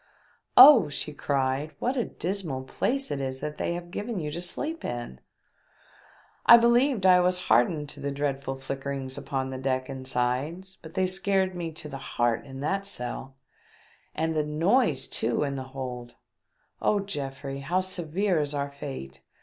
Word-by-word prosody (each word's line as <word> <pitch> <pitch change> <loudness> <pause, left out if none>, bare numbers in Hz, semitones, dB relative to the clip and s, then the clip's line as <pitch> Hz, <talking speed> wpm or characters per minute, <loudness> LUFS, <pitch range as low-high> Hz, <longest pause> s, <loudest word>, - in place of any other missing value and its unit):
"Oh," 250 - +10
she 150 +1 -4
cried, 140 +1 -1
"what 250 +3 -1
a 245 - 0
dismal 170 -7 -3
place 270 - -1
is 135 -2 -3
that 150 0 -5
they 170 - -1
have 175 0 -7
given 210 +3 -4
you 150 -2 -4
to 170 +3 -4
sleep 310 - -2
in! 120 - -5 1.3
I 235 - +11
believed 235 -1 +3
I 180 -1 +7
was 180 0 +2
hardened 145 +7 +3
to - - -7
the 140 - -3
dreadful 140 -1 -2
flickerings 135 0 -4
upon 135 -1 -3
the 130 - -5
deck 130 0 -1
and 130 -1 -7
sides, 140 +10 -1
but 160 +1 -12
they 190 -1 +2
scared 190 0 +1
me 170 -2 -4
to 155 -1 -6
the 135 -2 -7
heart 120 -1 -1
in 135 0 -8
that 195 +6 -1
cell 130 -4 -4 0.4
— - - -32
and 160 0 0
the 155 - +2
noises 160 - +2
too 115 +5 0
in 140 -1 -2
the 135 -1 -5
hold! 125 -2 -6 0.7
Oh, 210 - +2
Geoffrey, 140 -7 -5
how 170 +7 0
severe 185 0 -1
is 145 0 -3
our 140 0 -2
fate 100 - -7
150 Hz, 170 wpm, -27 LUFS, 135-185 Hz, 1.3 s, I